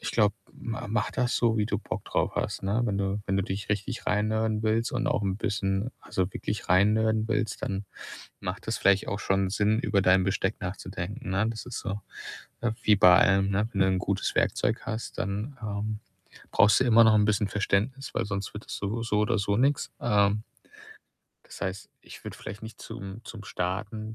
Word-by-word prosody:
ich - - -3
glaube, 105 -3 +3 0.2
ma 120 +1 -6
mach 105 -1 0
das 125 -1 0
so, 115 -2 +2
wie 105 -1 +1
du - - -1
Bock - - -5
drauf - - 0
hast, - - -2
ne? 100 +4 +1
Wenn 100 -4 0
du 100 +1 -1
wenn 95 - +1
du 95 - +2
dich 95 +1 -4
richtig 105 +4 -2
reinnerden 110 +1 +1
willst 115 +2 +1
und 125 +2 -1
auch 150 -8 +1
'n 95 -1 0
bisschen 100 +2 -1
also, 95 0 -2
wirklich 105 - -4
reinnerden 110 +3 +3
willst, 110 -1 -1
dann 95 0 -2 0.6
macht 90 +2 -5
das 110 - -1
vielleicht 100 0 +3
auch 100 - -2
schon 95 -1 +1
Sinn, 105 +2 +2
über 100 -5 +1
dein 95 0 +5
Besteck 95 +2 -1
nachzudenken, 95 0 -5
ne? 100 +3 +1
Das 110 -1 -7
ist 125 - -5
so, 100 +2 -4 0.6
ne, 120 -2 0
wie 105 - +5
bei 90 -2 +8
allem, 95 +1 +4
ne? 105 +3 +1
Wenn 100 - -2
du 95 - +5
'n 95 -1 +2
gutes 95 +1 -1
Werkzeug 110 - +1
hast, 110 +1 -5
dann, 105 +8 -3
ähm, 105 0 -3 0.5
brauchst 105 +1 +5
du - - +4
immer 115 -2 +7
noch 110 - +6
'n 105 -1 +5
bisschen 105 -1 +1
Verständnis, 105 +7 -1
weil - - 0
sonst 100 -1 -4
wird 105 - -8
das - - -5
so 105 +4 -3
so 105 -2 0
oder 110 +1 +2
so 100 0 +1
nix, 140 +2 +1
ähm 105 -1 +2 1.0
das - - -12
heißt, 95 0 -4
ich - - -13
würde - - -7
vielleicht 105 +3 -8
nicht 110 0 -9
zum 110 -1 -8
zum 110 -3 -9
Starten 105 +4 -3
105 Hz, 205 wpm, -28 LUFS, 100-110 Hz, 1.0 s, bei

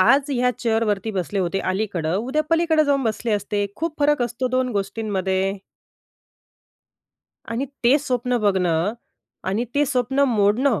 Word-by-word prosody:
आज 270 +8 +4
ह्या 250 -1 +2
चेअरवरती 220 -3 0
बसले 195 0 -2
होते 190 +1 0
अलीकडं, 185 -4 -1
उद्या 260 +9 0
पलीकडे 330 -2 +3
जाऊन 280 -1 +2
बसले 225 0 -1
असते. 205 0 -1
खूप 320 -1 -3
फरक 290 -2 +3
असतो 240 +2 -2
2 255 0 +1
गोष्टींमध्ये. 195 -2 -1 1.9
आणि 235 +4 -2 0.2
ते 260 +5 +6
स्वप्न 250 -3 -1
बघणं 185 -2 +1 0.6
आणि 215 +6 0
ते 290 +1 +3
स्वप्न 255 +2 0
मोडणं, 220 +3 +2
230 Hz, 135 wpm, -22 LUFS, 200-265 Hz, 1.9 s, ते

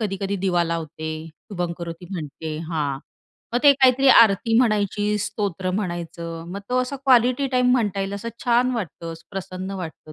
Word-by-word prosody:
कधी-कधी 200 -1 -2
दिवा 175 -2 +2
लावते, 160 -1 -4 0.3
शुभंमकरोती 170 -1 -6
म्हणते 155 -3 -5
हां. 145 -5 -1 0.5
मग 240 - +2
ते 285 - +8
काहीतरी 265 0 +4
आरती 225 -2 +6
म्हणायची, 210 -3 +1
स्तोत्र 190 -3 -2
म्हणायचं. 170 -3 -4
मग 200 - -5
तो 250 0 +1
असा 255 +2 -5
क्वालिटी 255 0 +3
टाईम 250 0 +3
म्हणता 210 -6 +1
येईल 195 +1 -3
असं 200 +3 -5 0.2
छान 245 +1 +3
वाटतं, 170 -5 -5 0.2
प्रसन्न 190 -1 -5
वाटतं 155 -2 -9
195 Hz, 150 wpm, -23 LUFS, 170-235 Hz, 0.5 s, ते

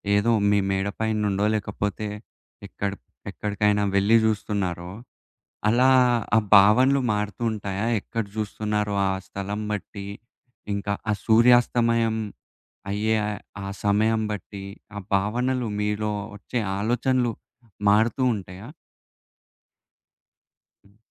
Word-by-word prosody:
ఏదో 110 +3 +3 0.2
మీ 100 0 +4
మేడ 95 +1 0
పైన్నుండో, 105 -2 0
లేకపోతే 105 +1 -3 0.6
ఎక్కడ 100 -1 -3 0.4
ఎక్కడికైనా 105 0 0
వెళ్లి 100 +4 +4
జూస్తున్నారో 100 -5 -1 0.8
అలా 125 +4 +4 0.5
ఆ - - +7 0.2
భావనలు 125 +8 +6
మారుతుంటాయా? 105 0 -2
ఎక్కడ 115 +1 -4
జూస్తున్నారో 105 -1 -2
ఆ - - +1 0.2
స్థలం 100 +2 -5
బట్టి, 100 0 -5 0.7
ఇంకా 100 0 -2 0.2
ఆ - - +3
సూర్యాస్తమయం 115 -1 +4 0.7
అయ్యే 110 +2 +1 0.5
ఆ - - -5 0.2
సమయం 110 +2 +2
బట్టి, 100 -1 -6 0.3
ఆ - - -3 0.2
భావనలు 120 +5 0
మీలో 105 0 -1 0.2
ఒచ్చే 120 +4 -4 0.2
ఆలోచనలు 120 +3 +1 0.6
మారుతువుంటాయా? 105 -3 +1 2.2
హ్మ్. 100 +1 -25
105 Hz, 90 wpm, -24 LUFS, 100-115 Hz, 2.2 s, ఆ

